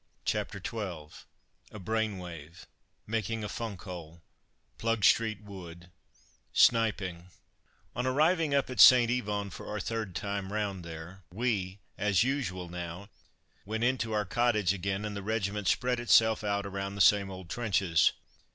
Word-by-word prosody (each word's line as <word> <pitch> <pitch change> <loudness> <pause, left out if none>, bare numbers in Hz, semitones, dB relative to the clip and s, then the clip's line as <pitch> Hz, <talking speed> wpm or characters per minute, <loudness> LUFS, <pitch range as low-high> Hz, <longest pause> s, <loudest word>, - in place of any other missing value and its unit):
CHAPTER - - -2
XII 90 -9 -6 0.6
A - - -9
BRAIN 110 +1 -1
WAVE 85 -1 -10 0.4
MAKING 110 0 -2
A - - -2
"FUNK 105 -3 -5
HOLE" 85 -3 -9 0.6
PLUGSTREET 110 -1 +2
WOOD 85 -3 -11 0.6
SNIPING 95 -6 +2 0.7
On 125 +3 -1
arriving 155 +2 +2
up 140 -2 +1
at 125 - -6
St. 120 +1 +9
Yvon 105 -5 -2
for - - -9
our 105 - -3
third 110 -2 -4
time 100 +1 -3
round 100 -4 -2
there, 85 +3 -9
we 100 -3 -1 0.2
as 100 0 +3
usual 110 -10 -2
now 85 +3 -7 0.5
went 110 +3 -3
into 120 -2 +1
our 105 -1 0
cottage 105 -3 +2
again, 100 +2 -3
and 105 -1 -4
the 100 - -4
regiment 105 -1 -2
spread 125 -1 +1
itself 110 -1 +4
out 100 -1 -1
around 100 0 -4
the 100 - -1
same 100 +1 +5
old 95 -2 -9
trenches. 95 -6 +2
100 Hz, 140 wpm, -30 LUFS, 95-115 Hz, 0.7 s, St